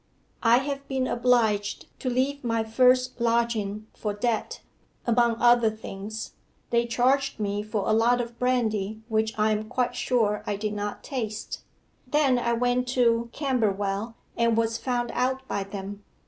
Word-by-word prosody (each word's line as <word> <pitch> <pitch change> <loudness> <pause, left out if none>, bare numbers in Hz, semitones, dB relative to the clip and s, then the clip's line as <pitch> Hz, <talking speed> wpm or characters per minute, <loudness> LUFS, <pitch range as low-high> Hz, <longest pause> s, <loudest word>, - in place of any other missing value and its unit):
I 235 0 +5
have 275 +1 -3
been 265 -1 -1
obliged 230 -5 +1
to 255 - -2
leave 265 +3 0
my 230 -2 0
first 255 +2 +3
lodging 230 -3 0
for 210 -2 -3
debt 225 +1 -1 0.5
among 235 -1 +3
other 240 -2 +5
things, 215 0 -7 0.4
they 235 0 +2
charged 265 +3 +1
me 205 0 -1
for 210 -1 -3
a 215 - +3
lot 235 +3 +3
of 235 -1 -5
brandy 220 -5 0
which 220 0 0
I 215 0 +3
am 215 0 -1
quite 250 -1 0
sure 215 -5 +1
I 205 - 0
did 210 +1 -3
not 205 0 -4
taste. 220 -5 -4 0.5
Then 285 -5 +3
I 235 0 0
went 245 +1 +1
to 235 -1 +3
Camberwell 220 -5 -1 0.2
and 230 -1 +2
was 230 0 +1
found 245 -1 -1
out 260 +1 -1
by 200 - -2
them. 200 +1 -7
230 Hz, 155 wpm, -26 LUFS, 215-250 Hz, 0.5 s, I